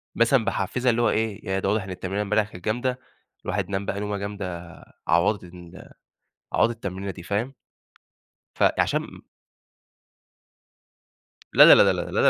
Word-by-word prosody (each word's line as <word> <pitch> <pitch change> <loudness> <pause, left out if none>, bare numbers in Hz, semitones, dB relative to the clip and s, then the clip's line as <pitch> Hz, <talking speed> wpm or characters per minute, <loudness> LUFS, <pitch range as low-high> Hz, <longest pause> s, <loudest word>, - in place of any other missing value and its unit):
مثلًا 115 0 +3
باحفزها 125 +2 -1
اللي 120 +1 0
هو - - +3
إيه 110 -1 -2
يعني 95 0 -1
ده 95 - 0
واضح 105 -1 0
إن 95 - -10
التمرينة 95 +2 -3
امبارح 105 +1 0
كانت 90 -1 -12
جامدة 125 +4 -1 0.5
الواحد 100 0 -2
نام 100 0 -2
بقى 100 - -3
نومة 105 0 -3
جامدة 90 -4 -6 0.3
عوضت 85 +5 +2
ال 90 0 -13 0.6
عوضت 120 - +2
التمرينة 100 -2 -5
دي 85 - -9
فاهم. 115 +9 -3 1.0
فعشان - - 0 2.3
لا، - - +9
لا، - - +10
لا، - - +7
لا، - - +1
100 Hz, 140 wpm, -24 LUFS, 95-110 Hz, 2.3 s, لا